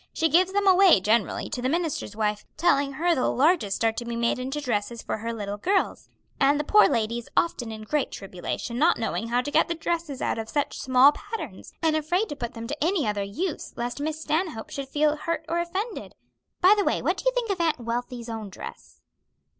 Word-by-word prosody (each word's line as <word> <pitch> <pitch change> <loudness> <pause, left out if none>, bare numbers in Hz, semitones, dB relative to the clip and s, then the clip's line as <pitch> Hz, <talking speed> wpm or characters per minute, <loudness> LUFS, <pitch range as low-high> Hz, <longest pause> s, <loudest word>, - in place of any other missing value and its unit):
She 325 0 +1
gives 365 +3 +4
them 400 +1 +1
away, 380 - +7
generally, 210 +2 +1
to 250 - -3
the 255 - 0
minister's 320 -10 -2
wife, 210 -1 -1
telling 285 -4 +2
her 340 +5 +2
the 260 - +1
largest 260 - +2
are 225 - +4
to 225 - -5
be 235 0 -4
made 235 +1 0
into 265 +4 -3
dresses 235 -4 -2
for - - -3
her 230 +2 -3
little 205 -3 -4
girls; 380 - 0 0.3
and 285 +1 +4
the - - 0
poor 425 +8 +6
lady 230 +1 0
is 235 - -12
often 245 -9 +1
in 215 0 -7
great 285 +5 0
tribulation, 195 +5 -5
not 330 +4 +4
knowing 225 0 -2
how 240 +2 +1
to 290 - -5
get - - +3
the 340 - -2
dresses 330 -4 -3
out - - -1
of 220 0 -5
such 290 -2 -1
small 260 +2 +6
patterns, 320 - -7
and 320 -1 +3
afraid 350 +7 0
to 290 - -4
put 245 -3 -5
them 230 0 -6
to 290 +4 -3
any 340 -3 +1
other 205 -1 -1
use, 300 - -4
lest 240 +4 -4
Miss 310 +1 -2
Stanhope 315 -6 -2
should 275 -1 -5
feel 300 +1 +2
hurt 330 +1 -3
or 335 +1 0
offended. 380 +6 -4 0.5
By 370 +3 +8
the 410 - +1
way, - - 0
what - - +1
do - - -7
you - - +5
think 470 -4 0
of 375 -3 -1
Aunt 325 -5 +1
Wealthy's 240 0 -4
own 220 -3 -5
dress?" - - -10
280 Hz, 225 wpm, -26 LUFS, 230-335 Hz, 0.5 s, By